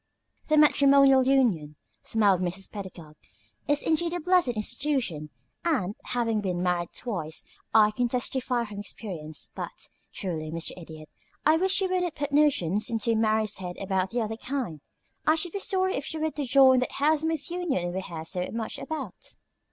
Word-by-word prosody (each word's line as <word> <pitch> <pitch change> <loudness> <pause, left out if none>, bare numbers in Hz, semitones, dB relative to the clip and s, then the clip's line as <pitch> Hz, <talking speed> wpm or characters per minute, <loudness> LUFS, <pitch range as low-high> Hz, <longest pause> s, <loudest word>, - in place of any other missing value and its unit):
"The 305 - +4
matrimonial 275 -3 +6
union," 210 - +2 0.3
smiled 200 -5 +2
Mrs. 185 +2 -4
Pedagog, 175 -7 -9 0.5
"is 290 0 +2
indeed 335 +2 +1
a 355 - -1
blessed 360 -1 +3
institution, 230 - -1 0.3
and, 250 - 0
having 230 -3 0
been 180 -3 -2
married 175 -1 0
twice, 170 -10 -4 0.3
I 215 -1 +6
can 245 +3 0
testify 250 0 0
from 210 -2 -8
experience; 170 -7 -5
but, - - -6 0.2
truly, 160 -5 -4
Mr. 165 +1 -3
Idiot, 160 -3 -11 0.4
I 310 +2 +5
wish 380 +3 +3
you 380 - +2
wouldn't 360 -3 -1
put 290 -1 -3
notions 235 - +2
into 230 0 0
Mary's 220 -1 +1
head 180 -2 -6
about 190 -1 -1
the 240 0 -1
other 220 +1 -4
kind. 240 - -4 0.5
I 310 - +6
should 325 +2 -1
be 400 - -2
sorry 375 -1 +1
if 275 - -3
she 320 - -4
were 315 0 -1
to 290 -2 -3
join 260 0 +6
that 250 - -2
housemaid's 310 +1 +1
union 275 - -1
we 190 - -2
hear 165 -4 -7
so 180 +2 -2
much 225 -1 -4
about. 315 -1 -7
230 Hz, 165 wpm, -27 LUFS, 185-295 Hz, 0.5 s, matrimonial